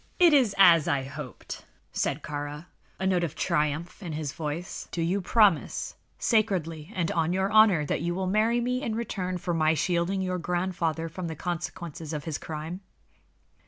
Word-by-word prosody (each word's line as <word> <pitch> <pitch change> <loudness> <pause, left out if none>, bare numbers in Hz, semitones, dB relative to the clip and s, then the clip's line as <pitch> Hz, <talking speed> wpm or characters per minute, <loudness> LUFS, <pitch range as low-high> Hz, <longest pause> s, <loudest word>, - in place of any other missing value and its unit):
"It 345 -4 +6
is 255 -8 +4
as 170 -5 +7
I 140 -2 +1
hoped," 135 -1 -8 0.3
said 140 +2 -1
Kāra, 145 +1 -5 0.3
a 190 - -1
note 185 -2 +2
of 160 -2 -3
triumph 150 +6 -1
in 170 -5 -5
his 150 -2 -3
voice. 160 +2 -5
"Do - - -4
you 175 +4 +1
promise, 200 -3 +2 0.2
sacredly 180 -7 0
and 170 -3 0
on 165 +1 +1
your 190 +2 0
honor, 215 -8 +6
that 145 - -1
you 175 +1 -1
will 190 0 -1
marry 215 +5 +2
me 250 +1 0
in 230 -6 -2
return 190 -5 -2
for 175 0 -2
my 160 -1 +3
shielding 180 +3 0
your 185 -1 -1
grandfather 175 -2 -1
from 170 +2 -5
the 160 - -4
consequences 170 -2 -5
of 150 -2 -3
his 160 -3 -3
crime?" 160 +4 -6
175 Hz, 175 wpm, -27 LUFS, 155-190 Hz, 0.3 s, as